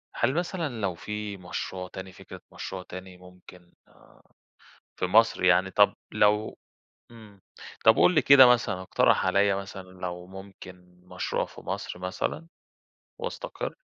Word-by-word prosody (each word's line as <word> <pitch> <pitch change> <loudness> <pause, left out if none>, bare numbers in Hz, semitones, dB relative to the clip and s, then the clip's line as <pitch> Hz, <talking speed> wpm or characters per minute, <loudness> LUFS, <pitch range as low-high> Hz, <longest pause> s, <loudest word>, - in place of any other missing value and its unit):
هل 120 +3 +1
مثلًا 165 - -3
لو 95 -3 -1
في 105 +2 -6
مشروع 90 0 -6
تاني، 95 0 -9
فكرة - - -12
مشروع 95 -1 -6
تاني 95 0 -10
ممكن 90 -1 -17 1.2
في 90 - -1
مصر 110 0 +3
يعني، 90 +1 +4
طب - - +4 0.2
لو 105 +1 +2 0.5
إمم، 110 -4 -15 0.4
طب - - +7
قُل 180 - +4
لي 155 - +4
كده 135 -1 +8
مثلًا، 120 -6 +2
إقترح 95 - +2
عليّا 100 +1 +3
مثلًا، 100 0 -6
لو 90 -1 -7
ممكن 95 -2 -13
مشروع - - -2
في - - -14
مصر - - -5
مثلًا 95 - -4 0.7
وأستقر؟ - - -5
95 Hz, 135 wpm, -27 LUFS, 90-110 Hz, 1.2 s, كده